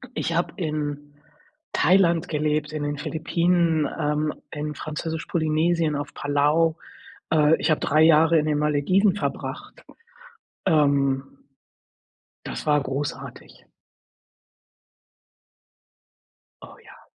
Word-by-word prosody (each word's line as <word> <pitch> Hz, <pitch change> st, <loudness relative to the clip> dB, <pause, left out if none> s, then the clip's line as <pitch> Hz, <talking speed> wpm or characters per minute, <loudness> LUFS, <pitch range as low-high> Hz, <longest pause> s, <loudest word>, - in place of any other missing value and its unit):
Ich 165 Hz, -, -2 dB
habe 170 Hz, -, -1 dB
in 145 Hz, -4 st, -4 dB, 0.6 s
Thailand 175 Hz, -2 st, +3 dB
gelebt, 150 Hz, -1 st, -1 dB
in 155 Hz, -1 st, -4 dB
den 145 Hz, 0 st, -3 dB
Philippinen, 165 Hz, +1 st, 0 dB
ähm, 150 Hz, +1 st, 0 dB, 0.2 s
in 150 Hz, 0 st, -5 dB
Französisch-Polynesien, 160 Hz, +1 st, -1 dB
auf 145 Hz, 0 st, -5 dB
Palau, 150 Hz, +3 st, +1 dB, 0.5 s
äh. 155 Hz, -1 st, +4 dB
Ich -, -, -1 dB
habe 155 Hz, -, +2 dB
3 155 Hz, +2 st, +2 dB
Jahre 160 Hz, +1 st, +5 dB
in 155 Hz, -, +1 dB
den 150 Hz, -1 st, 0 dB
Malediven 150 Hz, +7 st, +2 dB
verbracht, 205 Hz, -, -5 dB, 0.8 s
ähm. 140 Hz, -3 st, +2 dB, 1.2 s
Das -, -, -6 dB
war 150 Hz, -1 st, +3 dB
großartig. 140 Hz, +2 st, -6 dB, 3.0 s
Oh, -, -, -13 dB
ja. -, -, -16 dB
155 Hz, 100 wpm, -24 LUFS, 145-165 Hz, 3.0 s, Jahre